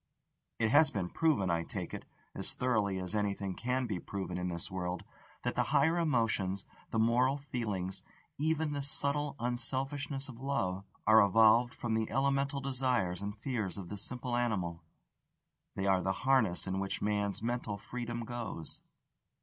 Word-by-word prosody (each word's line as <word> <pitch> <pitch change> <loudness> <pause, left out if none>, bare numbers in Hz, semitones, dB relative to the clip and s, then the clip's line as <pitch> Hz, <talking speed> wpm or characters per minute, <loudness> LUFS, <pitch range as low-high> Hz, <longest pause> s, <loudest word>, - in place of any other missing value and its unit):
It 110 -1 +2
has 150 +3 +7
been 90 -4 -3
proven, 140 - +2
I 85 0 +1
take - - -5
it, - - -6 0.3
as - - -3
thoroughly 110 -6 +1
as 95 +2 -3
anything 100 -2 -1
can 125 +5 -1
be 105 -6 -2
proven 95 -2 -4
in 90 - -1
this 85 0 -4
world, 90 -1 -3 0.4
that - - 0
the - - +2
higher 165 +2 +4
emotions, 110 - +1 0.2
the - - -2
moral 120 +5 +3
feelings, 105 -9 -3 0.4
even 160 0 +1
the 145 -1 -2
subtle 140 +1 0
unselfishness 135 +3 -2
of 120 -3 -10
love, 100 -9 -1 0.2
are 110 +1 +8
evolved 115 +4 +5
from 120 -2 -2
the 110 0 0
elemental 140 +2 +1
desires 125 -9 0
and 100 +1 -4
fears 110 -6 -2
of 95 -3 -7
the 105 - -5
simple 125 +3 -2
animal: 95 -9 -1 0.9
they 95 - -1
are 95 -1 +4
the 95 - +1
harness 120 -10 +3
in 95 0 -1
which 95 0 -2
man's 105 0 0
mental 120 -3 -1
freedom 120 +2 -5
goes. 110 -10 -5
115 Hz, 160 wpm, -33 LUFS, 95-130 Hz, 0.9 s, are